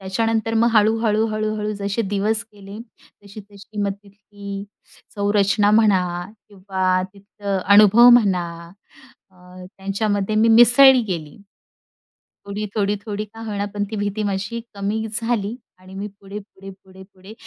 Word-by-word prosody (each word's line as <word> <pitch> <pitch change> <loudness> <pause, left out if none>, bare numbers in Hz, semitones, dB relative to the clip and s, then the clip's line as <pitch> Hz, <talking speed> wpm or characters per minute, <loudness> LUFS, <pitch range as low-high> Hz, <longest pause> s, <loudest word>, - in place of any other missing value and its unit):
त्याच्यानंतर 225 +3 -1
मग 235 +1 +3
हळू-हळू, 220 0 +2
हळू-हळू 215 -1 -3
जसे 200 +3 -2
दिवस 215 +3 0
गेले, 200 +1 -11 0.5
तशी-तशी 205 +1 -11
मग 200 -1 -1
तिथली 200 0 -10 0.5
संरचना 205 0 +2
म्हणा 215 -3 +4 0.5
किंवा 185 -2 -1
तिथलं 200 0 -5 0.2
अनुभव 215 +4 +7
म्हणा 185 -5 0 0.8
अ, 185 - -27 0.4
त्यांच्यामध्ये 200 +1 -2
मी 225 +1 +4
मिसळी 245 +3 +7
गेली. 165 -8 -6 1.1
थोडी, 205 +1 -5
थोडी, 205 -1 0
थोडी 210 0 -4
का 225 +2 -14
होईना, 205 -1 -3
पण 205 0 -2
ती 220 - -3
भीती 205 +1 -2
माझी 200 +3 -3 0.2
कमी 205 +2 -3 0.2
झाली 225 -1 -2 0.2
आणि 185 +1 -15
मी 200 +2 -5
पुढे, 200 +2 -8
पुढे, 195 -1 -14
पुढे, 190 0 -15
पुढे 190 +3 -14
205 Hz, 130 wpm, -21 LUFS, 195-215 Hz, 1.1 s, अनुभव